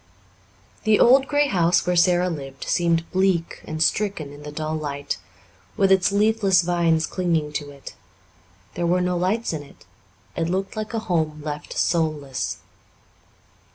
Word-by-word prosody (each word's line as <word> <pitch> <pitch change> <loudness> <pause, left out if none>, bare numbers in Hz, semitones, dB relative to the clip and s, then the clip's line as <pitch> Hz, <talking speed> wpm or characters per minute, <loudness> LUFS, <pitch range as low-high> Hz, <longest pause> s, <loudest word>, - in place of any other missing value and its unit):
The 215 -1 +3
old 265 +3 +6
grey 290 0 +2
house 175 -7 +2
where 180 0 +1
Sara 175 +1 +3
lived 135 -5 -6
seemed 170 -1 +1
bleak 185 -3 0
and 155 0 -1
stricken 160 -5 -1
in 145 - -12
the 150 0 -8
dull 155 +1 -3
light, 145 -8 -4 0.6
with 195 -1 +3
its 190 0 +4
leafless 200 -3 +3
vines 170 -2 +2
clinging 165 -5 -1
to 145 -1 -4
it. 140 -1 -11 0.8
There 175 - -1
were 180 +1 +2
no 180 0 0
lights 190 +4 0
in 155 - -4
it. 140 - -17 0.5
It 165 0 -1
looked 190 +2 -2
like 215 +1 -4
a - - 0
home 155 -4 -1
left 150 -1 -6
soulless. 155 -6 -1
170 Hz, 155 wpm, -23 LUFS, 155-190 Hz, 0.8 s, old